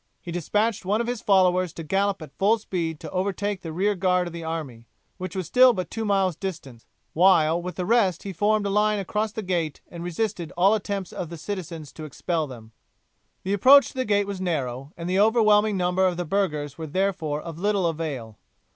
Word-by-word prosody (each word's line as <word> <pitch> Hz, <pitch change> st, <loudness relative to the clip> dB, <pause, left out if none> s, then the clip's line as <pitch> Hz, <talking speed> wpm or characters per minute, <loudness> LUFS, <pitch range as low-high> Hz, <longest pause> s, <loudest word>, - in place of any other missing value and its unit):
He 175 Hz, -, -8 dB
despatched 210 Hz, +6 st, 0 dB
one 205 Hz, +4 st, 0 dB
of 235 Hz, -, 0 dB
his 240 Hz, -1 st, -3 dB
followers 185 Hz, -3 st, +3 dB
to 165 Hz, -, -7 dB
gallop 195 Hz, +2 st, 0 dB
at 145 Hz, -2 st, -13 dB
full 210 Hz, +4 st, +3 dB
speed 170 Hz, -7 st, -3 dB
to 160 Hz, -, -7 dB
overtake 200 Hz, +1 st, -2 dB
the 165 Hz, -, -6 dB
rear 195 Hz, +6 st, +1 dB
guard 180 Hz, -1 st, +1 dB
of 175 Hz, -, -7 dB
the 170 Hz, -1 st, -6 dB
army, 145 Hz, -8 st, -5 dB, 0.3 s
which 185 Hz, -1 st, -5 dB
was 185 Hz, -2 st, -2 dB
still 255 Hz, +6 st, +6 dB
but 185 Hz, -4 st, -4 dB
two 225 Hz, -1 st, -3 dB
miles 195 Hz, -4 st, +1 dB
distant, 155 Hz, -, -7 dB, 0.3 s
while 170 Hz, -2 st, +4 dB
with 180 Hz, +1 st, -6 dB
the 180 Hz, -, -3 dB
rest 200 Hz, -5 st, +2 dB
he 195 Hz, -, -5 dB
formed 210 Hz, +3 st, +1 dB
a 200 Hz, -, -1 dB
line 210 Hz, +1 st, +2 dB
across 210 Hz, +2 st, -2 dB
the 220 Hz, 0 st, -5 dB
gate 170 Hz, -5 st, -2 dB
and 170 Hz, -1 st, -7 dB
resisted 175 Hz, -1 st, -3 dB
all 190 Hz, +3 st, +5 dB
the 220 Hz, -, +3 dB
attempts 200 Hz, -2 st, -5 dB
of 175 Hz, -, -5 dB
the 170 Hz, -, -7 dB
citizens 165 Hz, -5 st, -6 dB
to 155 Hz, -, -9 dB
expel 155 Hz, +2 st, -2 dB
them. 115 Hz, -4 st, -11 dB, 0.7 s
The 195 Hz, -, -1 dB
approach 270 Hz, +8 st, +7 dB
to -, -, -14 dB
the 260 Hz, -1 st, -1 dB
gate 205 Hz, -1 st, +2 dB
was 200 Hz, -2 st, -5 dB
narrow, 135 Hz, -6 st, -3 dB
and 170 Hz, 0 st, -5 dB
the 185 Hz, +2 st, +1 dB
overwhelming 215 Hz, -1 st, +4 dB
number 180 Hz, +1 st, +2 dB
of 180 Hz, -2 st, -2 dB
the 175 Hz, -, -2 dB
burghers 155 Hz, -6 st, -1 dB
were 160 Hz, -, -5 dB
therefore 170 Hz, -3 st, -1 dB
of 165 Hz, +1 st, -8 dB
little 200 Hz, -1 st, +1 dB
avail. 145 Hz, -10 st, -4 dB
185 Hz, 215 wpm, -25 LUFS, 165-205 Hz, 0.7 s, approach